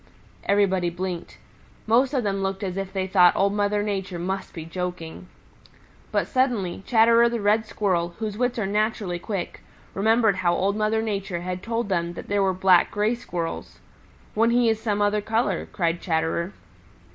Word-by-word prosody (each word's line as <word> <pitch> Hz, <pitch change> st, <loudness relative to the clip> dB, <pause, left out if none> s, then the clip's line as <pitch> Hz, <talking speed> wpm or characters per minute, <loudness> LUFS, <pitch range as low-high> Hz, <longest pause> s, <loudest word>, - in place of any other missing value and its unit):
Everybody 190 Hz, -3 st, +2 dB
blinked. 175 Hz, 0 st, -5 dB, 0.5 s
Most 255 Hz, +5 st, +3 dB
of 255 Hz, -, +1 dB
them 195 Hz, -1 st, -1 dB
looked 195 Hz, +1 st, -2 dB
as 185 Hz, -2 st, -3 dB
if 195 Hz, -1 st, -4 dB
they 190 Hz, -1 st, -2 dB
thought 180 Hz, -2 st, +5 dB
Old 200 Hz, +1 st, +2 dB
Mother 205 Hz, 0 st, +1 dB
Nature 195 Hz, -3 st, -3 dB
must 190 Hz, +3 st, -3 dB
be 165 Hz, -3 st, -7 dB
joking. 180 Hz, 0 st, -6 dB, 0.8 s
But -, -, +1 dB
suddenly 240 Hz, -10 st, 0 dB
Chatterer 230 Hz, 0 st, +5 dB
the 235 Hz, 0 st, -2 dB
Red 215 Hz, +2 st, +2 dB
Squirrel, 175 Hz, -5 st, -1 dB
whose 215 Hz, -2 st, -4 dB
wits 245 Hz, +2 st, -1 dB
are 220 Hz, -, 0 dB
naturally 205 Hz, -3 st, -1 dB
quick, 195 Hz, -1 st, -5 dB, 0.3 s
remembered 220 Hz, 0 st, +3 dB
how 175 Hz, -2 st, +2 dB
Old 200 Hz, +2 st, 0 dB
Mother 215 Hz, +1 st, +1 dB
Nature 195 Hz, -5 st, -3 dB
had 180 Hz, 0 st, -4 dB
told 230 Hz, 0 st, -2 dB
them 170 Hz, -2 st, -1 dB
that -, -, -9 dB
there 200 Hz, 0 st, +2 dB
were 195 Hz, -1 st, +3 dB
black 185 Hz, -1 st, +4 dB
Gray 210 Hz, +3 st, +1 dB
Squirrels. 175 Hz, -8 st, -5 dB, 0.6 s
"When 225 Hz, +2 st, +3 dB
he 240 Hz, -1 st, +3 dB
is 220 Hz, -1 st, 0 dB
some 205 Hz, -2 st, 0 dB
other 205 Hz, +1 st, +1 dB
color," 220 Hz, -3 st, -1 dB
cried 170 Hz, -2 st, -1 dB
Chatterer. 165 Hz, +1 st, -1 dB
200 Hz, 170 wpm, -24 LUFS, 180-220 Hz, 0.8 s, thought